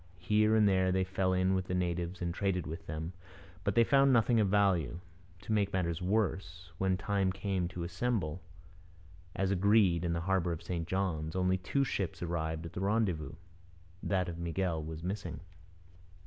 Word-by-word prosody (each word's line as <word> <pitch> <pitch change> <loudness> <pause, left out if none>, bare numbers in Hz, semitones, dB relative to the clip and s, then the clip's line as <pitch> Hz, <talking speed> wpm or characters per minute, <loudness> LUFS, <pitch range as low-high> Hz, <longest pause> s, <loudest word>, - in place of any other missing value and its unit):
Here 105 +5 +3
and 110 -2 +5
there 95 -1 +3
they 95 0 +2
fell 95 0 0
in 95 +1 +2
with 95 -1 -1
the 90 - -1
natives 90 0 -2
and 85 -1 -1
traded 90 -3 -1
with 80 +1 -7
them, 80 +2 -4 0.5
but 100 0 0
they 115 - +6
found 135 +2 +4
nothing 120 -1 +4
of 105 -3 +3
value. 95 -8 +2 0.4
To 110 - -7
make 100 -2 +1
matters 85 -2 -1
worse, 90 -3 -1
when 95 -1 +2
the 95 - -12
time 100 -1 +1
came 95 -1 -1
to 90 -1 -6
assemble, 90 -2 -2 0.9
as 95 0 0
agreed, 100 -3 +4
in 85 -1 0
the 85 - -1
harbour 90 -1 +1
of 85 - -7
St 85 -2 -3
John's, 90 -4 -1
only 95 0 +1
two 135 +10 0
ships 95 -10 -3
arrived 80 -1 -2
at 85 - -8
the - - -4
rendezvous. 95 -7 0 0.7
That 95 -2 0
of 85 -1 -6
Miguel 85 -1 -1
was 80 +1 -7
missing. 90 -5 -4
95 Hz, 180 wpm, -32 LUFS, 85-100 Hz, 0.9 s, they